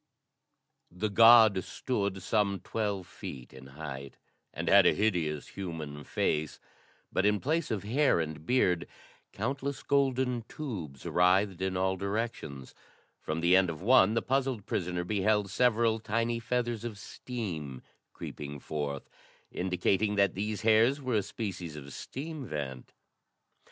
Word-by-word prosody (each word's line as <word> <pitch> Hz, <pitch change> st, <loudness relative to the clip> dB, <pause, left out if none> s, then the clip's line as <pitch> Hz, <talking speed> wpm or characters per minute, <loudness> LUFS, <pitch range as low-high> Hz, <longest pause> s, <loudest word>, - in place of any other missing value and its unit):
The 95 Hz, +5 st, -3 dB
god 110 Hz, -3 st, +7 dB
stood 100 Hz, -6 st, -3 dB
some 100 Hz, -2 st, +1 dB
twelve 100 Hz, -4 st, -2 dB
feet 65 Hz, -6 st, -9 dB
in 65 Hz, 0 st, -12 dB
height 70 Hz, -1 st, -8 dB, 0.3 s
and -, -, -5 dB
had -, -, +7 dB
a -, -, +4 dB
hideous 85 Hz, -8 st, 0 dB
human 80 Hz, -6 st, -6 dB
face, 75 Hz, 0 st, -1 dB, 0.5 s
but, -, -, +1 dB
in 105 Hz, 0 st, +3 dB
place 160 Hz, +6 st, 0 dB
of 105 Hz, -3 st, -2 dB
hair 130 Hz, -, +2 dB
and 80 Hz, -2 st, -4 dB
beard, 90 Hz, -5 st, +2 dB, 0.4 s
countless 135 Hz, +5 st, -3 dB
golden 130 Hz, -3 st, +1 dB
tubes 90 Hz, -, -6 dB
writhed 95 Hz, +1 st, +2 dB
in 95 Hz, -1 st, -1 dB
all 95 Hz, 0 st, +1 dB
directions. 100 Hz, -, -4 dB, 0.5 s
From 80 Hz, +1 st, -3 dB
the 85 Hz, +2 st, +5 dB
end 95 Hz, -1 st, +4 dB
of 85 Hz, +1 st, -6 dB
one, 110 Hz, -2 st, +5 dB
the 115 Hz, -, +1 dB
puzzled 130 Hz, -5 st, 0 dB
prisoner 90 Hz, -1 st, -2 dB
beheld 105 Hz, +1 st, +1 dB
several 115 Hz, -1 st, +2 dB
tiny 115 Hz, +2 st, -1 dB
feathers 120 Hz, -1 st, -2 dB
of 115 Hz, -3 st, -5 dB
steam 90 Hz, -, -6 dB, 0.3 s
creeping 70 Hz, 0 st, -7 dB
forth, 70 Hz, -1 st, -4 dB, 0.4 s
indicating 95 Hz, +3 st, 0 dB
that 100 Hz, -1 st, +3 dB
these 105 Hz, +1 st, -3 dB
hairs 115 Hz, +5 st, +4 dB
were 130 Hz, -3 st, -3 dB
a -, -, +2 dB
species 95 Hz, -6 st, -5 dB
of 70 Hz, -2 st, -9 dB
steam 145 Hz, -1 st, -6 dB
vent. 65 Hz, -4 st, -5 dB
100 Hz, 135 wpm, -30 LUFS, 85-115 Hz, 0.5 s, god